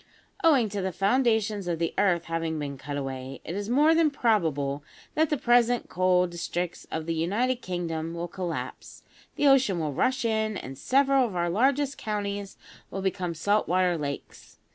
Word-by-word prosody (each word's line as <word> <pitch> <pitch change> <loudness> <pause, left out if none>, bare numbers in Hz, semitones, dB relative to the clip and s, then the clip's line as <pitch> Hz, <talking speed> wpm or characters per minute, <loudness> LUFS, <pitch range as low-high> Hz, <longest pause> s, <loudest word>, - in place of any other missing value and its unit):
Owing 280 -9 +5
to 200 0 -3
the 190 0 -1
foundations 215 -1 +1
of 170 -1 -1
the 165 0 -1
earth 175 -4 +2
having 165 -1 -2
been 145 -2 -4
cut 145 +2 -6
away, 135 -1 -5
it 165 - -4
is 205 +2 -4
more 295 +6 +5
than 325 -1 +4
probable 160 - 0 0.3
that 315 0 +2
the 300 - +1
present 245 -1 +3
coal 180 0 +3
districts 175 0 -4
of 160 0 -4
the 165 - -1
United 210 +11 0
Kingdom 170 -5 -4
will 170 +1 -3
collapse, 175 -1 -6 0.3
the - - 0
ocean 265 -9 +4
will 155 -3 -2
rush 260 - +1
in, 220 -2 0
and 135 -5 -7
several 270 - +3
of 200 - -8
our 175 -1 0
largest 275 +7 +1
counties 205 -2 -3 0.3
will 195 - -5
become 180 -3 -2
salt 205 +6 +1
water 180 0 +2
lakes. 145 -3 -6
190 Hz, 175 wpm, -27 LUFS, 165-240 Hz, 0.3 s, Owing